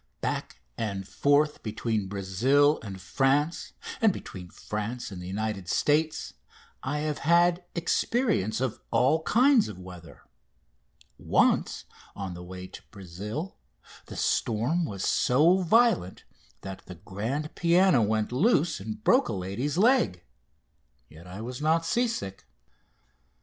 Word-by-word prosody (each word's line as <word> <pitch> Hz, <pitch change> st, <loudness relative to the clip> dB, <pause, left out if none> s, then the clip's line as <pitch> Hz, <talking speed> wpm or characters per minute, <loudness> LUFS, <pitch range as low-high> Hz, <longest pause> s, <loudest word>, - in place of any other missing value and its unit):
Back -, -, -4 dB, 0.2 s
and 100 Hz, -3 st, -3 dB
forth 145 Hz, +4 st, +2 dB
between 110 Hz, -2 st, -2 dB
Brazil 115 Hz, +10 st, +2 dB
and 95 Hz, -3 st, -8 dB
France 135 Hz, -, 0 dB, 0.3 s
and 220 Hz, -2 st, +5 dB
between 90 Hz, -, -9 dB
France 105 Hz, +5 st, -5 dB
and 90 Hz, -2 st, -7 dB
the 90 Hz, -, -7 dB
United 100 Hz, -1 st, -3 dB
States 155 Hz, +6 st, +1 dB, 0.5 s
I 145 Hz, +3 st, -2 dB
have 150 Hz, -1 st, -2 dB
had 175 Hz, +3 st, +3 dB
experience 175 Hz, -, 0 dB
of 130 Hz, -4 st, -2 dB
all 145 Hz, +6 st, +3 dB
kinds 250 Hz, -, +4 dB
of 105 Hz, -, -8 dB
weather. 90 Hz, -2 st, -12 dB, 1.0 s
Once, -, -, +1 dB, 0.3 s
on 95 Hz, -2 st, -5 dB
the 85 Hz, -, -9 dB
way 90 Hz, +1 st, -8 dB
to -, -, -11 dB
Brazil, 105 Hz, -, -7 dB, 0.5 s
the -, -, -9 dB
storm 125 Hz, +11 st, 0 dB
was 100 Hz, -9 st, -5 dB
so 155 Hz, +9 st, +4 dB
violent 190 Hz, -, +2 dB, 0.4 s
that 95 Hz, -1 st, -8 dB
the 90 Hz, -, -8 dB
grand 115 Hz, -, -4 dB
piano 175 Hz, -4 st, +4 dB
went 110 Hz, +1 st, 0 dB
loose 170 Hz, -, +2 dB
and 215 Hz, 0 st, -7 dB
broke 255 Hz, +3 st, +4 dB
a -, -, -2 dB
lady's 100 Hz, -, -3 dB
leg, 190 Hz, -, +3 dB, 0.9 s
yet 80 Hz, +3 st, -14 dB
I 95 Hz, +4 st, -8 dB
was 125 Hz, +4 st, -6 dB
not 160 Hz, +2 st, +2 dB
sea 240 Hz, +8 st, +1 dB
sick. 100 Hz, -, -6 dB
125 Hz, 130 wpm, -27 LUFS, -, 1.0 s, and